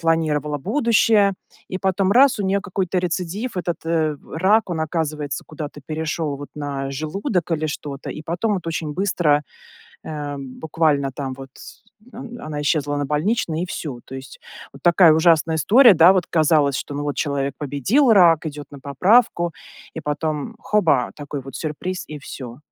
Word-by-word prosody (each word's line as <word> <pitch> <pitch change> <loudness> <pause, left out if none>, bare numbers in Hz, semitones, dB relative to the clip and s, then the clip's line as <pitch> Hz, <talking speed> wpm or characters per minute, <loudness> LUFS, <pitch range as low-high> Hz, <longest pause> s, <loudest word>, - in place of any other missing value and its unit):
планировала 155 -3 0
будущее. 215 - +3 0.4
И 185 - -4
потом 190 0 +1
раз- 265 +2 +5
у - - -1
нее 195 +1 +1
какой-то 190 -2 -2
рецидив, 180 +5 -3
этот 175 -1 -2
э 160 -2 0 0.2
рак, 190 +5 +3
он 165 -2 -2
оказывается 155 -3 -3
куда-то 150 -2 -7
перешел 155 -1 -2
вот 145 +1 -9
на 140 -2 -4
желудок 170 - -2
или 155 -1 0
что-то, 145 -2 -6
и 155 - -7
потом 175 +7 -1
вот 180 -4 -5
очень 160 -2 -3
быстро, 165 -5 +1 0.6
э, - - -9
м, 145 -4 -6
буквально 150 -3 +1
там 135 0 -5
вот 135 0 -9
с - - -13 0.3
он 240 0 -9
она 150 -1 -4
исчезла 145 0 0
на 145 -1 -1
больничный 160 +1 0
и - - -2
всё. 140 -8 -6
То 135 - -10
есть 130 0 -9 0.4
вот 140 - -14
такая 170 -2 +6
ужасная 160 0 +3
история, 230 - +6
да, 170 +2 +7
вот, 185 -2 0
казалось, 150 -4 +3
что, 145 - -5
ну 145 - -3
вот, 145 -1 -3
человек 140 -2 -1
победил 150 - +2
рак, 170 -6 +5
идет 145 -2 -6
на 140 - -10
поправку, 175 - +2 0.4
и - - -5
потом 150 +6 -3
хоба- 180 - +1
такой 145 -1 -6
вот 135 +1 -9
сюрприз 170 +4 -4
и 150 - -7
всё. 125 -4 -9
160 Hz, 170 wpm, -21 LUFS, 145-185 Hz, 0.6 s, да